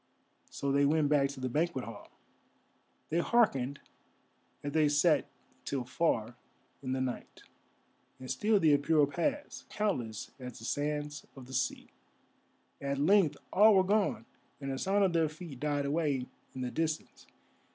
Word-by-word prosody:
So 140 Hz, -, -2 dB
they 140 Hz, +1 st, +3 dB
went 150 Hz, 0 st, +3 dB
back 140 Hz, -2 st, +3 dB
to 140 Hz, -1 st, -8 dB
the 130 Hz, -, -2 dB
banquet 150 Hz, 0 st, -1 dB
hall. 115 Hz, -, -10 dB, 1.0 s
They 165 Hz, -, +2 dB
hearkened 140 Hz, -, +2 dB, 0.8 s
as 145 Hz, -, -3 dB
they 155 Hz, -1 st, +3 dB
sat 150 Hz, 0 st, +3 dB, 0.4 s
till 135 Hz, -3 st, -2 dB
far 120 Hz, -4 st, 0 dB, 0.5 s
in 130 Hz, -1 st, -3 dB
the 130 Hz, -, -1 dB
night, 130 Hz, -1 st, -5 dB, 0.8 s
and 130 Hz, -, -8 dB
still 205 Hz, +10 st, +2 dB
the 155 Hz, -5 st, +5 dB
Apura 150 Hz, 0 st, +3 dB
passed, 275 Hz, -, -3 dB
countless 125 Hz, -, -2 dB
as 125 Hz, -2 st, -8 dB
the 115 Hz, -, -10 dB
sands 145 Hz, +1 st, -3 dB
of 130 Hz, -2 st, -10 dB
the 130 Hz, -, -11 dB
sea. 130 Hz, 0 st, -2 dB, 0.9 s
At 140 Hz, 0 st, -2 dB
length 155 Hz, 0 st, +4 dB, 0.2 s
all 210 Hz, +2 st, +7 dB
were 190 Hz, -, +5 dB
gone, 205 Hz, +1 st, +1 dB, 0.3 s
and 135 Hz, -1 st, -4 dB
the 135 Hz, -, -3 dB
sound 200 Hz, +1 st, +2 dB
of 185 Hz, -3 st, +2 dB
their 165 Hz, -2 st, +2 dB
feet 155 Hz, -4 st, -10 dB
died 145 Hz, -1 st, -1 dB
away 145 Hz, -3 st, 0 dB, 0.3 s
in 130 Hz, -, -5 dB
the 125 Hz, -1 st, -3 dB
distance. 160 Hz, -1 st, -3 dB
145 Hz, 155 wpm, -31 LUFS, 130-170 Hz, 1.0 s, all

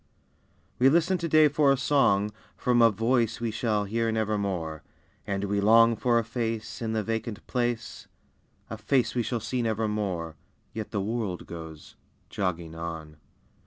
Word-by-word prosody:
We 130 Hz, +2 st, +6 dB
listen 170 Hz, +4 st, +2 dB
today 155 Hz, -2 st, +5 dB
for 145 Hz, -1 st, +3 dB
a 135 Hz, -, +3 dB
song 110 Hz, -7 st, +2 dB, 0.3 s
From 120 Hz, -1 st, +2 dB
a 115 Hz, -, +7 dB
voice 115 Hz, +1 st, 0 dB
we 115 Hz, -1 st, -2 dB
shall 110 Hz, -2 st, 0 dB
hear 115 Hz, +2 st, 0 dB
never 110 Hz, -1 st, 0 dB
more. 85 Hz, -7 st, -3 dB, 0.5 s
And 100 Hz, 0 st, -2 dB
we 100 Hz, 0 st, 0 dB
long 115 Hz, +2 st, +6 dB
for 120 Hz, +2 st, +2 dB
a 115 Hz, -, +2 dB
face, 115 Hz, -1 st, -4 dB
In 110 Hz, -1 st, -2 dB
the 110 Hz, -1 st, 0 dB
vacant 110 Hz, -1 st, -4 dB
place, 120 Hz, -2 st, -3 dB, 0.6 s
A 110 Hz, -, -5 dB
face 125 Hz, +3 st, +1 dB
we 125 Hz, -, 0 dB
shall 115 Hz, +1 st, -2 dB
see 120 Hz, +3 st, -2 dB
nevermore, 105 Hz, -7 st, -2 dB, 0.4 s
Yet 110 Hz, -2 st, -5 dB
the 100 Hz, -, -2 dB
world 105 Hz, -3 st, -3 dB
goes 80 Hz, -2 st, -10 dB, 0.3 s
"jogging 85 Hz, -4 st, -3 dB
on." 80 Hz, -2 st, -7 dB
110 Hz, 160 wpm, -27 LUFS, 100-120 Hz, 0.6 s, a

